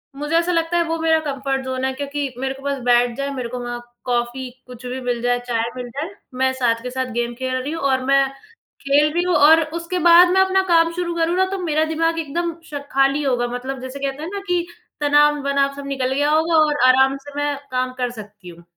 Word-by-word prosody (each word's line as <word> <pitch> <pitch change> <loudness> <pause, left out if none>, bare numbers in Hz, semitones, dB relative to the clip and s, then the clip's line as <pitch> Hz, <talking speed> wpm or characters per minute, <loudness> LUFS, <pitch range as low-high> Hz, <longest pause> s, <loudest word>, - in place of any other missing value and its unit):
मुझे 295 +3 -2
ऐसा 345 +1 +1
लगता 335 0 0
है, 340 - +3
वो 330 0 -2
मेरा 320 0 +3
कम्फ़र्ट 270 -1 -2
ज़ोन 260 0 -2
है, 265 - -1
क्योंकि 280 -1 -4
मेरे 265 +1 -2
को 270 0 -14
बस 280 0 -1
बैठ 240 -1 +3
जाए, 275 0 -2
मेरे 245 -2 -4
को 250 0 -5
वहाँ 240 0 -5 0.3
कॉफी, 245 +1 -2 0.2
कुछ 250 0 -11
भी 255 +1 -4
मिल 245 -2 -2
जाए, 245 0 +1
चाय 230 -1 -1
मिल 245 -1 -6
जाए, 285 +8 -5 0.3
मैं 260 0 +2
साथ 235 -3 0
के 250 - -4
साथ 255 -1 -3
गेम 240 0 -2
खेल 260 +1 -3
रही 260 +4 -3
हूँ 330 - -5
और 260 0 +1
मैं 275 0 +4 0.5
खेल 290 +2 +3
रही 345 +1 +1
हूँ 360 -1 +1
और 315 +2 +6 0.2
उसके 345 +2 -3
बाद 345 +1 +8
मैं 380 - +5
अपना 380 0 +3
काम 330 -1 +4
शुरू 345 -1 -3
करूँ 335 +1 +1
ना, 375 - +4
तो 390 +1 -4
मेरा 310 -2 +1
दिमाग 330 +1 0
एकदम 335 +2 -3 0.2
श 285 - -3
खाली 275 +2 +2
होगा। 245 -3 0
मतलब 260 +1 -5
जैसे 260 +2 -7
कहते 275 +2 -4
हैं 330 - -4
ना 400 - -3
कि 355 -1 0 0.4
तनाव-वनाव 290 -1 +2
सब 280 0 -8
निकल 265 -2 -1
गया 290 +2 +1
होगा 320 +1 +2
और 295 -2 -1
आराम 265 +1 +4
से 285 - -10
मैं 290 0 0 0.2
काम 255 0 -1
कर 245 -1 -1
सकती 205 -4 -11
हूँ। 170 0 -14
275 Hz, 235 wpm, -20 LUFS, 255-320 Hz, 0.5 s, बाद